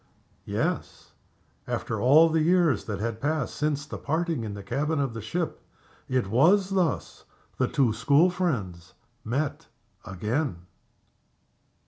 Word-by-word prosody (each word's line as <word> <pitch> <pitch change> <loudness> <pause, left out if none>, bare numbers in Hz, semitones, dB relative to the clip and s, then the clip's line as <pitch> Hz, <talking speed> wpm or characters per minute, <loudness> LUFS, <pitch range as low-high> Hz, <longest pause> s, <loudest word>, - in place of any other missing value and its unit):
Yes! - - -3 0.6
After - - -3
all 155 +6 +6
the 160 0 +1
years 170 - +3
that 105 -2 -4
had 115 +1 -3
passed 150 -2 -1
since 150 -1 -1
the - - -7
parting 160 -3 -1
in 105 -2 -5
the 100 - -8
cabin 145 +9 -1
of 135 -4 -1
the 115 - -6
ship, 165 - -3 0.5
it 130 -3 +1
was 180 - +3
thus 180 -8 -1 0.4
the - - +3
two 125 -5 +2
school 140 +10 +4
friends 105 - -3 0.3
met 140 +6 -2 0.4
again. 105 - -3
140 Hz, 130 wpm, -26 LUFS, 115-160 Hz, 0.6 s, all